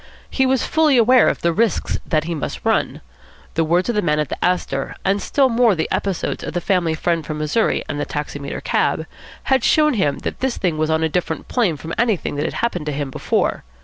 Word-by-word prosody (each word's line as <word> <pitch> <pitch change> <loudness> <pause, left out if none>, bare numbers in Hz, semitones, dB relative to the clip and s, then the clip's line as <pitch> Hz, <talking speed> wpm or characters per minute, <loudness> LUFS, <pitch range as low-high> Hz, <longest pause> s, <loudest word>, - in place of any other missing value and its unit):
He 265 -1 +2
was 265 -1 +1
fully 310 -4 +3
aware 245 +1 +5
of - - -3
the 170 0 +2
risks 225 +3 0
that 155 -2 +1
he 170 +2 -3
must 155 - -5
run. - - 0 0.5
The 165 - +1
words 170 +3 +1
of 240 - 0
the 210 - +1
man 150 -4 +1
at 150 -3 -1
the - - -4
Astor, 175 -7 -1
and 195 +1 +1
still 275 -2 +2
more 230 -4 +3
the 160 - -1
episodes 195 -3 -2
of - - -5
the 175 - 0
family 175 -3 +1
friend 165 0 0
from 155 0 -5
Missouri 155 +9 0
and 145 -1 -4
the - - -1
taximeter 145 -1 -5
cab, - - 0 0.4
had 265 -2 +2
shown 300 -1 +4
him 150 - +1
that - - -4
this 265 -2 -1
thing 170 -5 -1
was 155 0 +1
on 160 0 +1
a - - +3
different 160 -1 -3
plane 200 - +1
from 160 +4 -7
anything 225 -6 +1
that 145 - -1
had - - -3
happened 180 -10 -3
to - - 0
him 140 -1 -3
before. - - -1
175 Hz, 230 wpm, -20 LUFS, 155-230 Hz, 0.5 s, aware